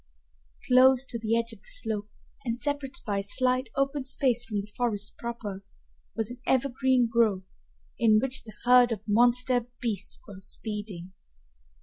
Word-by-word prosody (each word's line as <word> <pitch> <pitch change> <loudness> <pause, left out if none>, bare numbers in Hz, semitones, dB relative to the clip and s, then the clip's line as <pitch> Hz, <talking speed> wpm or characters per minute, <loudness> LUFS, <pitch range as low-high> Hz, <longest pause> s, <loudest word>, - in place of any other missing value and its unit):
Close 260 +1 +6
to 235 -3 -5
the 225 +1 +1
edge 230 0 -2
of 220 - -14
the - - -14
slope, 215 -2 -2 0.3
and 235 -2 -2
separated 285 0 -3
by 205 -3 -1
a - - -3
slight 255 +4 +1
open 275 0 0
space 260 -2 +1
from 220 -3 -3
the 200 - -4
forest 215 -4 -2
proper, 215 -5 -5 0.5
was 225 0 -1
an 245 0 -10
evergreen 260 -1 +2
grove, 215 -5 +1 0.5
in 220 -3 +5
which 265 +3 -1
the 215 - -11
herd 245 0 +6
of 215 -1 -4
monster 245 +2 +3
beasts 225 -5 -2
was 195 -2 -10
feeding. 205 -5 -6
235 Hz, 155 wpm, -28 LUFS, 210-255 Hz, 0.5 s, Close